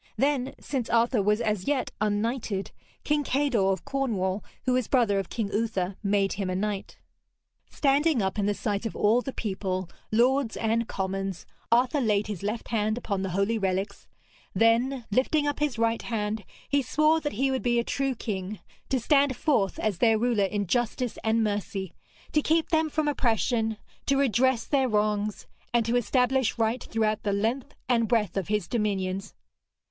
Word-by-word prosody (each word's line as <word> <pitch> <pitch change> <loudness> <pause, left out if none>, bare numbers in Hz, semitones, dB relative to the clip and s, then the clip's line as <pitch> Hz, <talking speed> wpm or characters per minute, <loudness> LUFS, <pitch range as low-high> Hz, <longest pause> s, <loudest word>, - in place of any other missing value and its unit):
Then, 275 -2 +1
since 260 -5 -3
Arthur 235 0 +3
was 210 +3 +2
as 210 -4 -1
yet 280 -3 0
unknighted, 215 -1 -1 0.3
King 295 -1 +1
Kador 260 -9 +2
of 190 - -3
Cornwall, 205 -8 -1 0.2
who 255 - +2
was 255 -3 +1
brother 230 -7 +3
of 195 - -4
King 215 -3 -3
Uther, 200 -4 -1
made 200 -1 +1
him 195 -2 -3
a 185 - -1
knight. 200 0 -3 0.7
Standing 285 0 +2
up 190 +1 -1
in 200 - +1
the 205 - +1
sight 205 +2 -2
of - - -8
all 220 +4 +3
the 270 - -5
people, 190 -5 -3 0.2
lords 245 +2 +2
and 230 +1 0
commons, 195 -1 -3 0.3
Arthur 250 +4 +3
laid 210 -3 +2
his 210 -5 -5
left 215 +3 -3
hand 215 -1 0
upon 200 -5 -2
the 190 - -2
holy 200 +5 0
relics; 195 +1 -2 0.5
then, 235 +3 +2
lifting 280 +6 +2
up 290 0 -1
his 295 -5 0
right 230 0 +1
hand, 210 -2 -3 0.2
he 285 0 +2
swore 305 +5 +2
that 295 - -3
he 270 +5 +1
would 260 - -1
be 240 -1 +1
a 235 - +2
true 270 +1 -1
king, 205 -3 -4 0.3
to 265 - +1
stand 280 +1 +3
forth 210 -11 +1
as 205 -5 -1
their 225 -2 +4
ruler 225 -3 +2
in 205 +1 -1
justice 240 +4 -1
and 225 +1 +2
mercy, 200 -3 -3 0.4
to 300 - +3
keep 320 +2 +1
them 320 -1 +2
from 310 0 -1
oppression, 225 -4 +1 0.3
to 275 - +3
redress 260 -2 +2
their 270 -3 +1
wrongs, 210 -1 0 0.3
and 235 -2 +3
to 230 +2 0
establish 250 +1 +2
right 230 +2 0
throughout 215 -1 0
the 205 - -1
length 230 +8 -1
and 235 -3 +2
breadth 215 -6 +1
of 195 -4 -2
his 210 -4 0
dominions. 195 -3 -2
225 Hz, 175 wpm, -27 LUFS, 205-255 Hz, 0.7 s, their